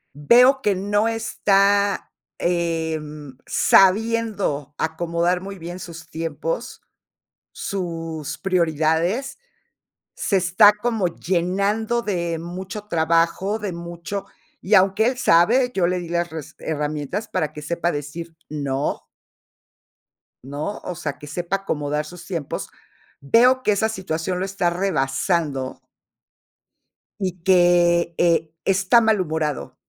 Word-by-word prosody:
Veo 250 - +5
que 205 -5 +1
no 205 +3 +1
está, 200 -3 +1 0.3
em, 160 -4 -2
sabiendo, 200 - +2
acomodar 170 +2 0
muy 195 +1 -8
bien 175 +1 -7
sus 165 -2 -10
tiempos, 165 - -4 0.7
sus 165 -5 -4
prioridades, 170 - 0 0.8
se 200 - -1
está 190 +3 +6
como 210 -2 -1
llenando 195 +7 0
de 170 -6 -2
mucho 185 +5 -6
trabajo, 170 +5 +1
de 205 -3 -3
mucho 170 +3 -6 0.4
y 200 - -1
aunque 195 +2 +5
él 250 +1 +1
sabe, 245 +6 +4
yo 185 -3 +2
le 180 +1 0
di 175 -1 -7
las 170 0 -1
res 160 -3 -8
herramientas 150 +5 -3
para 155 -5 -2
que 150 - -8
sepa 170 +3 -1
decir: 160 +3 -6
"No" 140 -2 -2 1.4
¿No? 145 +9 -5
O 180 - -5
sea, 150 -5 -4
que 150 - -10
sepa 175 +5 -2
acomodar 150 -5 -2
sus 175 +2 -11
tiempos. 165 -7 -4 0.5
Veo 245 - +4
que - - +3
esa 215 +2 +1
situación 180 -3 -3
lo 185 - -1
está 195 -2 0
rebasando 150 -5 -1 1.4
y 185 -3 -2
que, 175 -2 +4
eh, 165 -2 +2
está 195 +5 +4
malhumorado. 160 - -1
175 Hz, 115 wpm, -22 LUFS, 160-200 Hz, 1.4 s, está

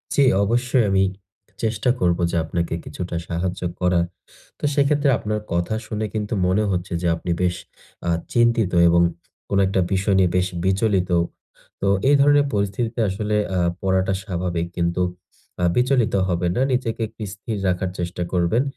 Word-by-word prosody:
জ্বী, 140 - +5 0.2
অবশ্যই 120 +3 +2
আমি 95 0 +3 0.6
চেষ্টা 110 +2 0
করব 85 -5 +2
যে - - -2
আপনাকে 85 +1 -2
কিছুটা 90 -1 -5
সাহায্য 90 +1 -3 0.2
করার। 90 -1 +2 0.5
তো - - -23
সেক্ষেত্রে 145 0 +2
আপনার 105 0 -2
কথা 85 +5 0
শুনে 110 -1 -2
কিন্তু 105 0 -2
মনে 95 +4 +2
হচ্ছে 90 -1 -2
যে 90 - 0
আপনি 85 +1 -4
বেশ 90 -1 +1 0.5
আ - - +2 0.2
চিন্তিত 115 -4 +3 0.2
এবং 85 0 +4 0.5
কোনো 100 0 +2
একটা 95 0 +1
বিষয় 95 +1 +1
নিয়ে 90 -2 +4
বেশ 90 0 +2 0.2
বিচলিত। 95 -1 +1 0.7
তো 100 - 0 0.2
এই 145 - +6
ধরনের 145 0 +5
পরিস্থিতিতে 105 +4 -1
আসলে 105 +2 -2 0.2
আ - - +2 0.2
পড়াটা 95 0 +1
স্বাভাবিক 85 -2 -2
কিন্তু 85 +1 0 0.6
আ - - +1
বিচলিত 125 -2 +2
হবেন 90 -1 0
না। - - +2
নিজেকে 120 -2 -1
একটু 110 +1 -17
স্থির 105 +2 -5
রাখার 90 0 0
চেষ্টা 90 0 -3
করবেন 90 +8 +2
95 Hz, 155 wpm, -22 LUFS, 90-115 Hz, 0.7 s, এই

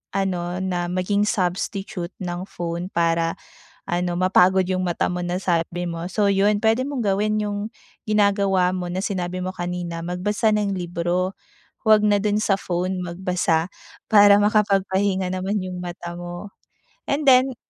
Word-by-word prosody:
ano 185 -2 -1
na 175 -2 -1
maging 185 +3 0
substitute 190 -1 -2
ng 175 +1 -4
phone 170 -1 -4
para 165 0 +1 0.5
ano 175 0 0
mapagod 185 +1 +4
yung 185 -1 0
mata 175 -2 0
mo 180 - -3
na 175 +1 -2
sabi 175 -1 -1
mo, 170 0 -5
so 205 +2 +1
'yun 205 +1 +2
pwede 225 +3 +2
mong 280 -3 -3
gawin 210 +2 +1
yung 205 -1 -3 0.5
ginagawa 200 -3 +3
mo 180 -1 -4
na 185 - -2
sinabi 185 -3 -3
mo 185 - -3
kanina, 175 -1 -4
magbasa 205 +5 0
ng 205 -1 0
libro. 175 +1 -1 0.6
Wag 215 -1 +6
na 205 -1 +3
dun 210 0 +1
sa 195 -2 +2
phone 180 +1 -2
magbasa 175 -2 0 0.4
para 205 -2 +8
makapagpahinga 195 -2 +1
naman 190 +3 -1
yung 180 -1 -5
mata 175 -1 -6
mo 175 +3 -7 0.6
and 285 +1 0
then 255 -1 +5
185 Hz, 150 wpm, -22 LUFS, 175-205 Hz, 0.6 s, para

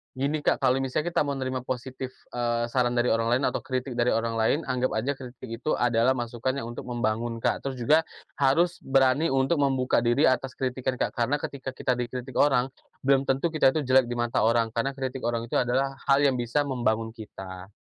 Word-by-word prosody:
Gini, 145 +3 -1
Kak. - - +2
Kalau 130 -1 +3
misalnya 145 +5 -1
kita 170 - +1
mau 145 - -2
nerima 130 -1 -3
positif, 130 +1 -5 0.2
eee, 120 -1 0
saran 120 0 +1
dari 120 - +2
orang 115 0 +1
lain 130 +3 +2
atau - - -2
kritik 130 0 -3
dari 120 0 +2
orang 115 0 0
lain, 115 +6 +2
anggap 130 -1 0
aja 130 +6 -1
kritik 130 -1 -10 0.2
itu 155 - 0
adalah 120 +1 +2
masukan 120 0 -2
yang 115 - -5
untuk 120 - -7
membangun, 120 -1 -2
Kak. - - 0
Terus 135 -2 -4
juga 145 +6 +4 0.4
harus 165 +6 +2
berani 135 +4 +3
untuk 135 +4 +2
membuka 135 -4 +1
diri 120 +5 +3
atas 130 0 +1
kritikan, 130 -1 -3
Kak. - - -1
Karena 130 +5 0
ketika 135 -1 -5
kita 130 -1 -1
dikritik 125 +1 -5
orang, 135 -3 +3 0.3
belum 135 0 +3
tentu 135 +4 +1
kita 155 -5 +3
itu 145 -2 -2
jelek 130 -2 +4
di 120 - -3
mata 120 -2 +1
orang, 115 +1 +3
karena 115 +4 0
kritik 130 -1 -5
orang 115 0 -1
itu - - -4
adalah 130 +2 +1
hal 140 -1 +4
yang 140 -2 +3
bisa 120 +3 -1
membangun 115 -3 -1
kita. 95 -3 -9
130 Hz, 205 wpm, -26 LUFS, 120-135 Hz, 0.4 s, juga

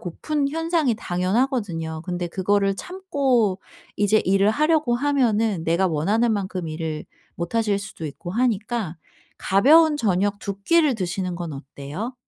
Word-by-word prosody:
고픈 280 - -2
현상이 325 -5 0
당연하거든요. 180 - -1
근데 175 -1 -3
그거를 195 +2 +1
참고 270 - 0 0.4
이제 205 +1 +3
일을 195 +2 +3
하려고 305 -1 +2
하면은 230 - +1
내가 170 +3 +2
원하는 210 +9 +1
만큼 185 -4 -3
일을 155 -1 -4 0.3
못 170 +6 -5
하실 210 -3 +1
수도 200 -5 -7
있고 145 +5 -7
하니까 215 -5 -1 0.4
가벼운 300 +10 +5
저녁 205 -3 0
2 200 0 -6
끼를 315 -1 +3
드시는 185 -2 -3
건 170 -3 -5
어때요? 145 - -7
205 Hz, 300 characters per minute, -23 LUFS, 175-250 Hz, 0.4 s, 가벼운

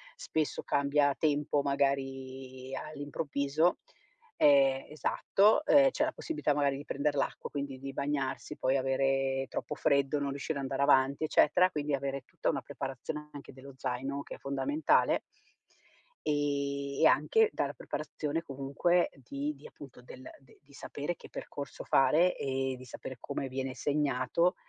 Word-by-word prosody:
spesso 155 -2 -2
cambia 140 0 +2
tempo, 145 -1 +1
magari 135 -2 -2
all'improvviso, 145 +2 -1 0.6
ehm, 135 -2 +5
esatto, 195 - +3
uhm, 275 -2 +6
c'è 295 - 0
la 315 - +1
possibilità 310 - -1
magari 140 -1 +1
di 145 - -7
prender 145 +1 -1
l'acqua, 140 - -2
quindi 140 -2 -5
di 135 +1 -6
bagnarsi, 140 -1 -2
poi 130 +1 +1
avere 135 0 +1
troppo - - -4
freddo, 140 +1 +2
non 140 0 -1
riuscire 140 +2 -3
a - - -3
andare 135 0 -2
avanti, 140 +1 +4
eccetera, 175 +4 +4
quindi 150 -1 -2
avere 140 -1 -3
tutta - - -2
una 140 -4 -1
preparazione 140 +3 -6
anche 145 -1 -10
dello 135 +1 -12
zaino, 135 +2 -3
che - - -8
è - - -13
fondamentale 290 - +2 1.1
ehm, 140 -1 -1
e - - +6
anche 445 -1 +4
dalla - - -1
preparazione, 155 +2 -4
comunque, 140 +4 +1
di 140 +3 -4
di 140 - -12
appunto 135 -3 -13
del 130 +1 -12 0.2
de 135 -2 -22
di 140 0 -21
sapere 145 +5 -4
che - - -14
percorso 140 -2 -7
fare 170 +6 +4
e 135 -1 -1
di 130 - -11
sapere 130 +1 -8
come 135 - -4
viene 130 0 -4
segnato, 145 +4 +1
140 Hz, 150 wpm, -31 LUFS, 135-150 Hz, 1.1 s, uhm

